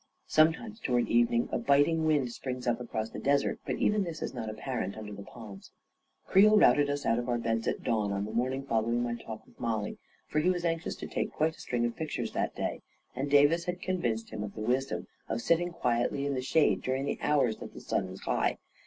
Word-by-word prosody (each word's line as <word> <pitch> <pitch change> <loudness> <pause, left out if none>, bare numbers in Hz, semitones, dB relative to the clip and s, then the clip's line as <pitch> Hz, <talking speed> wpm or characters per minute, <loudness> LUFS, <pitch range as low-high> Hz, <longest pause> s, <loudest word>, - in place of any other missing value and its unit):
Sometimes, 165 +8 +2
toward 125 - +1
eve 120 0 +4
ning, 120 0 +1
a - - 0
biting 145 +3 +3
wind 145 -6 +2
springs 125 0 -5
up 120 0 0
across 110 -2 -3
the - - -6
desert, 140 0 +1
but - - 0
even 210 -1 +2
this 170 -3 -5
is - - -4
not 115 -4 -4
apparent 110 -3 -4
under 105 -1 -7
the 100 - -8
palms. 100 -1 -11 0.6
Creel 210 +3 +6
routed 145 -7 +5
us 145 0 -2
out 115 +1 +2
of 120 +1 -4
our 120 - +2
beds 115 -1 -1
at - - -1
dawn 105 -3 0
on 100 0 -1
the 110 - -6
morning 130 +4 -1
following 115 -1 +1
my 120 -1 -1
talk 110 -2 -8
with - - -23
Mollie, 110 -3 -2 0.3
for 155 - 0
he 165 +4 +3
was 175 -1 0
anxious 165 0 -1
to - - -7
take - - -2
quite 160 +1 0
a - - -20
string 120 -1 -1
of 120 - -2
pictures 160 -2 -3
that - - -2
day, - - -3 0.3
and 140 +2 -2
Davis 145 +4 +5
had 180 0 -3
convinced 120 -13 -2
him 105 - -4
of 105 - -7
the 110 - -6
wisdom 130 +5 0 0.2
of 110 - -1
sit 165 +8 +3
ting 175 +1 -2
quietly 140 -3 0
in 140 - 0
the 130 - -1
shade 150 +4 +3
during 130 +1 -1
the - - -2
hours 135 -7 +2
that - - -9
the - - -7
sun - - -1
was - - -9
high. - - 0
130 Hz, 235 wpm, -30 LUFS, 115-155 Hz, 0.6 s, Creel